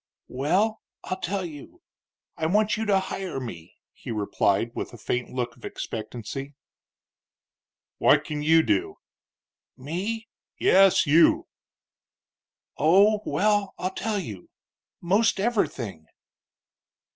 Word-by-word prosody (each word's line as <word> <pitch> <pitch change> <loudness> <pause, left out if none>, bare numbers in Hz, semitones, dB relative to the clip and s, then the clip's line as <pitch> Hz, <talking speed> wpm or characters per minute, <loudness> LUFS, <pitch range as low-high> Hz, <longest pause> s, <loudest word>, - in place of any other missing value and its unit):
"Well, 185 - 0 0.2
I'll 185 - -4
tell 190 +1 -2
you. 150 -4 -11 0.5
I 160 - -1
want 210 +4 +2
you 220 - -2
to 195 -2 +4
hire 190 -5 -4
me," 90 -11 -8 0.2
he - - -11
replied, 105 0 0
with - - -5
a - - -9
faint 125 +3 -2
look 120 -1 -3
of 120 - -22
expectancy. 120 +5 -6 1.4
"What - - +5
can 150 -1 -4
you 160 +2 +5
do?" 390 - 0 0.8
"Me?" 190 - -4 0.3
"Yes, 195 -2 +5
you." 160 +3 +5 1.3
"Oh, 200 +8 +5
well, 205 -1 +1
I'll 185 +1 -3
tell 215 +2 -2
you. 105 - -7 0.5
Most 200 +4 +2
everything." 120 - -1
170 Hz, 110 wpm, -25 LUFS, 125-200 Hz, 1.4 s, What